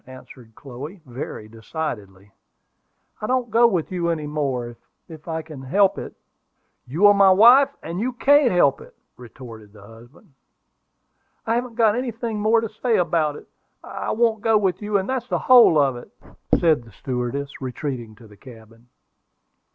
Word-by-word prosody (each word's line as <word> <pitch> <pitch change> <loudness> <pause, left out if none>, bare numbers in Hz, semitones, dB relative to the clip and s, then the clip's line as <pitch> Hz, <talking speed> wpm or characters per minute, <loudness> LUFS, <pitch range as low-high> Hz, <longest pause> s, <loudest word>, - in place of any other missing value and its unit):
answered 130 -3 -15
Chloe, 140 +8 -10
very 120 -4 -8
decidedly. 105 - -7 0.9
"I 215 - -3
don't 250 -2 -1
go 235 +2 +5
with 180 -7 -2
you 175 -2 -2
any 160 -3 -2
more, 135 -5 -3 0.3
if 160 -1 -13
I 160 -1 -4
can 155 -4 -11
help 190 +9 +1
it." - - -9 0.7
"You 160 +11 +1
are 205 - +8
my 200 -1 +5
wife, 240 +8 +6
and 170 +3 -5
you 245 +4 -1
can't 280 +2 +4
help 160 -6 +2
it," - - -16 0.2
retorted 115 -4 -13
the 105 -2 -16
husband. 120 - -18 1.1
"I 225 - 0
haven't 240 0 -3
got 220 -3 +3
anything 235 -3 -4
more 220 +2 +2
to 225 - -3
say 240 -3 +2
about 160 -4 0
it. - - -13 0.4
I - - -6
won't 225 -1 0
go 225 0 +3
with 195 -2 -1
you; 210 -1 0
and 190 - -3
that's 260 -2 -3
the - - -1
whole 245 -10 +6
of 140 -3 +2
it," 120 - -13 0.5
said 160 -6 +2
the 115 - -17
stewardess, 130 +3 -5
retreating 125 -4 -6
to 115 +1 -17
the 105 -1 -18
cabin. 115 0 -16
160 Hz, 165 wpm, -22 LUFS, -, 1.1 s, are